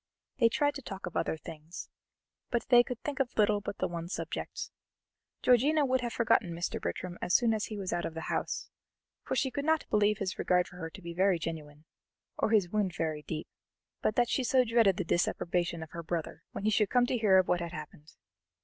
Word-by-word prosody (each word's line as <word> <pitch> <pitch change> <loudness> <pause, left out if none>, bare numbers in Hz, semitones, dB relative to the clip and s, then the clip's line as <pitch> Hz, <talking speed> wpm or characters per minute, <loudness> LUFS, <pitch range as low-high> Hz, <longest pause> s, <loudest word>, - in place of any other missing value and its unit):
They 230 -2 +6
tried 290 +4 +1
to 280 - -7
talk 195 -5 -7
of 180 - -7
other - - 0
things, 160 +1 -9 0.6
but 235 - -1
they 245 -1 +8
could 240 -1 -5
think 290 -2 -3
of 265 -2 -1
little 210 -1 +3
but 200 - -5
the - - 0
one 170 -1 -5
subject. - - -4 0.7
Georgiana 280 +5 +4
would 260 -1 +1
have 240 -1 -2
forgotten 230 -7 +2
Mr. 170 +1 -3
Bertram 180 -1 -4
as 180 - +1
soon 235 -2 +4
as 215 -1 -1
he 215 - -6
was 195 -2 -3
out 175 - -1
of 165 - -5
the 160 - -4
house, - - -3 0.5
for - - -3
she 265 - +1
could 280 - -3
not 315 +1 +2
believe 210 0 +3
his 190 -2 -3
regard 180 -1 +2
for 180 - -13
her 165 -2 -5
to 190 +3 -12
be 170 0 -6
very 185 +1 +3
genuine, 155 -2 -6 0.5
or - - 0
his 205 -5 +3
wound 200 -5 0
very 155 -3 -2
deep, 155 +1 -5 0.5
but 215 - +1
that 240 -1 +3
she 260 - 0
so 255 +1 +4
dreaded 230 -5 +3
the 185 - 0
disapprobation 170 0 0
of 160 - -11
her 170 - -5
brother, 165 0 -4
when - - -6
he 215 - +2
should 210 -1 +3
come 245 -1 +4
to 250 - -1
hear 200 -4 +5
of 185 - +4
what 180 - +2
had 170 -1 -4
happened. 150 -2 -9
195 Hz, 225 wpm, -31 LUFS, 170-235 Hz, 0.7 s, they